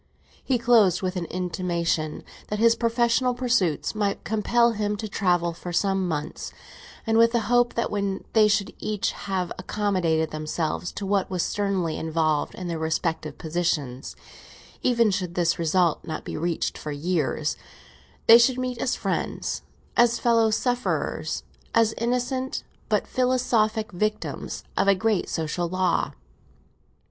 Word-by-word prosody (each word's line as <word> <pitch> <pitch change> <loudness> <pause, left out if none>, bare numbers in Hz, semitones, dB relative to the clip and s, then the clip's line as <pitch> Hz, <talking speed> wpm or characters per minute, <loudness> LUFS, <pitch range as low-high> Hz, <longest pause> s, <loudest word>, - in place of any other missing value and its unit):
He 260 - +1
closed 230 -7 +4
with 185 0 -1
an 180 -2 -2
intimation 170 -3 -2 0.2
that 210 - -2
his 230 +1 +5
professional 235 +2 +2
pursuits 235 - +1
might 205 -2 -1
compel 235 +3 +2
him 210 -1 -1
to 215 - -4
travel 175 -4 +1
for 175 +1 -7
some 195 +1 +1
months, 150 -3 -4 0.5
and 225 0 +3
with 230 +1 +5
the 235 - +2
hope 245 +1 +2
that 235 - -1
when 200 -2 -2
they 215 -2 +6
should 200 -1 +1
each 210 -2 -1
have 190 -3 -3
accommodated 180 -6 0
themselves 155 +2 -2
to 200 - -5
what 195 -1 +1
was 185 -2 -1
sternly 195 -5 -1
involved 160 -2 0
in 185 - -6
their 165 -2 -3
respective 160 -1 -2
positions—even 170 - -2
should 180 -3 -2
this 170 -1 +1
result 170 0 +2
not 155 -1 -6
be - - -5
reached 170 +1 -2
for 150 - -5
years—they 145 - +1
should 245 +1 +4
meet 255 -2 -3
as 250 - 0
friends, - - -2 0.3
as 240 0 +4
fellow 230 -2 +3
sufferers, 245 +3 -1 0.3
as 225 -1 +4
innocent 250 +2 -1 0.3
but - - +2
philosophic 235 -4 +1
victims 215 +4 -3
of - - +1
a 200 - +6
great 215 0 0
social 165 +2 -2
law. 185 -1 +1
195 Hz, 140 wpm, -25 LUFS, 170-230 Hz, 0.5 s, they